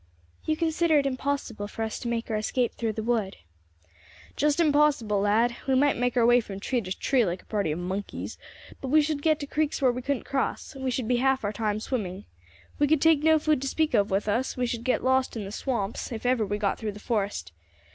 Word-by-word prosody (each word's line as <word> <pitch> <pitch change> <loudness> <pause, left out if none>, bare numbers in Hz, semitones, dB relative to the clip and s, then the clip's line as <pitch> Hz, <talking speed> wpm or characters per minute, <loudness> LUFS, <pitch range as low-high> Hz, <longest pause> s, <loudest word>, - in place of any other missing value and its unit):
"You 310 0 0
consider 325 -1 +2
it 280 - +2
impossible 260 -5 -2
for 225 +2 -5
us 220 -1 -3
to 240 - -5
make 230 -1 -2
our - - 0
escape 235 +3 0
through 225 -2 -2
the 220 - -4
wood." 220 -4 -1 1.0
"Just 295 0 +2
unpossible, 290 -10 +3
lad. 225 +4 +2
We 265 - +3
might 285 +2 +3
make 245 +1 0
our 235 - +5
way 240 +1 +6
from 200 -4 -6
tree 245 +4 -1
to 185 -2 -5
tree, 260 -3 +2
like 180 -2 -3
a - - -30
party 200 -7 -1
of 155 - -2
monkeys, 190 +3 -5 0.4
but 270 - -4
we 300 +3 +5
should 295 -1 -2
get 310 0 +2
to - - -3
creeks 300 +1 -1
where 260 -3 +4
we 250 +1 -5
couldn't 275 0 -2
cross; 270 +2 -2
we 265 -1 -3
should 250 -2 -2
be 245 0 +2
half 265 0 +2
our 205 0 -1
time 215 -1 -1
swimming. 205 -5 -4 0.5
We 290 - +4
could 310 0 +3
take 320 -1 +4
no 315 0 +5
food 305 -3 +1
to 275 - -2
speak 315 +2 0
of 205 -2 +3
with 195 +2 0
us; 235 +6 0
we 250 - +1
should 235 -1 -3
get 255 - 0
lost 260 -1 +1
in 210 - -4
the 195 - -7
swamps, 225 -2 -3
if 230 0 -6
ever 245 -4 +2
we 205 - -1
got 205 -2 -1
through 215 -2 -3
the 205 - -10
forest. 205 - -2
245 Hz, 235 wpm, -27 LUFS, 210-280 Hz, 1.0 s, way